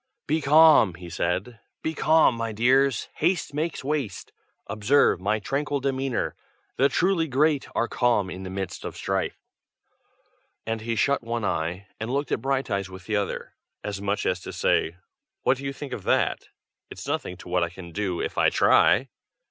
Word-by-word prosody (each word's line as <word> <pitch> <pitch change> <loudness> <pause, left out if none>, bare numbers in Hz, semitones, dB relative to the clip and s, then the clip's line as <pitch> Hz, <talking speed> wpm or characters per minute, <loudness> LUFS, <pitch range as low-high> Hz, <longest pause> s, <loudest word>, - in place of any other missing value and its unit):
"Be 155 +2 0
calm!" 150 - +6
he 85 -1 -10
said. 95 +8 -2 0.2
"Be 160 - -1
calm, 160 -3 +4
my 115 -1 -3
dears! 130 +3 +2
haste 165 -2 0
makes 155 0 -2
waste. 140 -8 -3 0.3
Observe 110 -1 +2
my 105 +3 +1
tranquil 140 +6 -2
demeanor! 135 -1 -1 0.4
the 135 +2 +4
truly 170 +2 +1
great 145 +1 +2
are 115 - +1
calm 115 -4 +1
in 95 0 -7
the 95 - -6
midst 95 0 -5
of - - -6
strife." - - -2 1.3
And 115 0 -2
he 115 +1 -2
shut 140 +5 +2
one 115 -1 -3
eye, 90 +3 -2
and 110 +2 -4
looked 140 +3 -1
at - - 0
Brighteyes 130 -8 -1
with 95 -1 -11
the 110 - -1
other, 100 -1 -3 0.3
as 100 -1 -4
much 100 +1 -1
as 90 - 0
to - - -8
say 80 - +1 0.5
"What 130 - +3
do 140 - -8
you 135 - -1
think 140 0 -7
of - - -5
that? - - +1 0.4
it's - - -9
nothing - - -3
to - - -12
what - - +1
I 85 - -1
can 90 0 -11
do 95 -1 -2
if - - -3
I - - +5
try!" 125 +8 +4
120 Hz, 180 wpm, -25 LUFS, 100-140 Hz, 1.3 s, calm